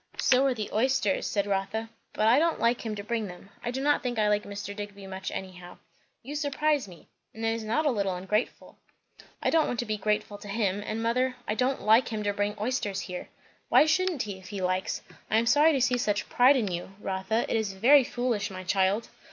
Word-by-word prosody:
"So 260 Hz, +1 st, +4 dB
are 260 Hz, -, +1 dB
the 215 Hz, -2 st, -5 dB
oysters," 230 Hz, -3 st, +1 dB
said 200 Hz, -1 st, 0 dB
Rotha; 205 Hz, +3 st, -2 dB, 0.2 s
"but 215 Hz, -, +1 dB
I 240 Hz, +5 st, +6 dB
don't 335 Hz, +1 st, +1 dB
like 235 Hz, +1 st, +1 dB
him 220 Hz, -2 st, -3 dB
to 205 Hz, -, -6 dB
bring 220 Hz, 0 st, -2 dB
them. 180 Hz, +2 st, -12 dB
I 240 Hz, -, -2 dB
do 260 Hz, +2 st, -3 dB
not 290 Hz, 0 st, +3 dB
think 245 Hz, -2 st, -3 dB
I 215 Hz, -1 st, +3 dB
like 210 Hz, 0 st, +1 dB
Mr. 200 Hz, 0 st, -6 dB
Digby 205 Hz, -1 st, -7 dB
much, 190 Hz, 0 st, -5 dB
anyhow." 180 Hz, -2 st, -8 dB, 0.5 s
"You 275 Hz, +5 st, -7 dB
surprise 295 Hz, -3 st, 0 dB
me. 175 Hz, -4 st, -14 dB, 0.3 s
And 225 Hz, 0 st, -4 dB
it 225 Hz, -, +2 dB
is 230 Hz, -1 st, -4 dB
not 230 Hz, +9 st, 0 dB
a 290 Hz, -, +4 dB
little 200 Hz, -5 st, -1 dB
ungrateful." 190 Hz, +5 st, -3 dB, 0.6 s
"I -, -, +2 dB
don't 320 Hz, -1 st, +3 dB
want 245 Hz, -, -2 dB
to -, -, -5 dB
be 215 Hz, -1 st, -2 dB
grateful 210 Hz, 0 st, -1 dB
to -, -, -10 dB
him. 200 Hz, -1 st, -1 dB
And 225 Hz, +1 st, -3 dB
mother, 250 Hz, +3 st, +1 dB
I -, -, 0 dB
don't 255 Hz, +4 st, 0 dB
like 220 Hz, +4 st, +5 dB
him 215 Hz, -2 st, -3 dB
to 205 Hz, 0 st, 0 dB
bring 205 Hz, +1 st, -2 dB
oysters 210 Hz, -4 st, -1 dB
here!" 180 Hz, -2 st, -7 dB, 0.4 s
"Why -, -, +6 dB
shouldn't 345 Hz, -1 st, +1 dB
he, 200 Hz, -3 st, -6 dB
if 185 Hz, -, -14 dB
he 205 Hz, -, -5 dB
likes? 185 Hz, 0 st, -1 dB, 0.3 s
I 220 Hz, -, +3 dB
am 230 Hz, -, +2 dB
sorry 295 Hz, +6 st, +5 dB
to 275 Hz, -, +1 dB
see 250 Hz, -1 st, +2 dB
such 205 Hz, -3 st, 0 dB
pride 275 Hz, -2 st, +5 dB
in 215 Hz, -7 st, 0 dB
you, 175 Hz, +2 st, -5 dB
Rotha. 190 Hz, +4 st, -1 dB
It -, -, -1 dB
is 220 Hz, -3 st, -1 dB
very 260 Hz, +8 st, +6 dB
foolish, 240 Hz, -4 st, -1 dB
my 185 Hz, -1 st, -7 dB
child." 195 Hz, +3 st, +1 dB
215 Hz, 230 wpm, -28 LUFS, 200-250 Hz, 0.6 s, I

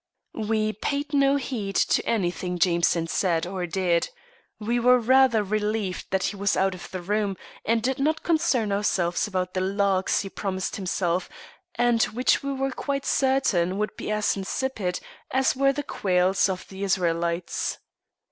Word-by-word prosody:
We 215 Hz, -1 st, +1 dB
paid 285 Hz, +7 st, -3 dB
no 275 Hz, 0 st, +4 dB
heed 235 Hz, -8 st, -3 dB
to -, -, +2 dB
anything 180 Hz, -4 st, -1 dB
Jameson 170 Hz, -1 st, +2 dB
said 165 Hz, 0 st, 0 dB
or 180 Hz, -1 st, -4 dB
did. 175 Hz, -1 st, +1 dB, 0.5 s
We 235 Hz, +3 st, 0 dB
were 250 Hz, +1 st, +5 dB
rather 250 Hz, -2 st, +4 dB
relieved 210 Hz, -1 st, -2 dB
that 190 Hz, -1 st, 0 dB
he -, -, -1 dB
was 200 Hz, 0 st, 0 dB
out 190 Hz, 0 st, +2 dB
of 180 Hz, -, -9 dB
the 185 Hz, -2 st, -6 dB
room, 205 Hz, 0 st, -1 dB, 0.3 s
and 230 Hz, 0 st, +1 dB
did 265 Hz, +2 st, 0 dB
not 310 Hz, +3 st, 0 dB
concern 260 Hz, -10 st, +1 dB
ourselves 195 Hz, -3 st, 0 dB
about 185 Hz, -2 st, -2 dB
the 185 Hz, -, -1 dB
"larks" 195 Hz, 0 st, +1 dB
he 195 Hz, -, -6 dB
promised 190 Hz, -1 st, -3 dB
himself, 185 Hz, -2 st, -1 dB, 0.5 s
and 240 Hz, -1 st, +2 dB
which 240 Hz, +5 st, +2 dB
we 280 Hz, -, -3 dB
were 270 Hz, 0 st, -1 dB
quite 275 Hz, +1 st, -3 dB
certain 215 Hz, -10 st, +2 dB
would 210 Hz, +1 st, -2 dB
be -, -, -6 dB
as 210 Hz, 0 st, +1 dB
insipid 195 Hz, -1 st, -2 dB, 0.3 s
as 265 Hz, 0 st, +2 dB
were 275 Hz, +1 st, +3 dB
the 290 Hz, +1 st, -4 dB
quails 185 Hz, -3 st, +1 dB
of 185 Hz, -1 st, -4 dB
the 195 Hz, +1 st, -6 dB
Israelites. 170 Hz, -2 st, -1 dB
200 Hz, 160 wpm, -25 LUFS, 185-245 Hz, 0.5 s, were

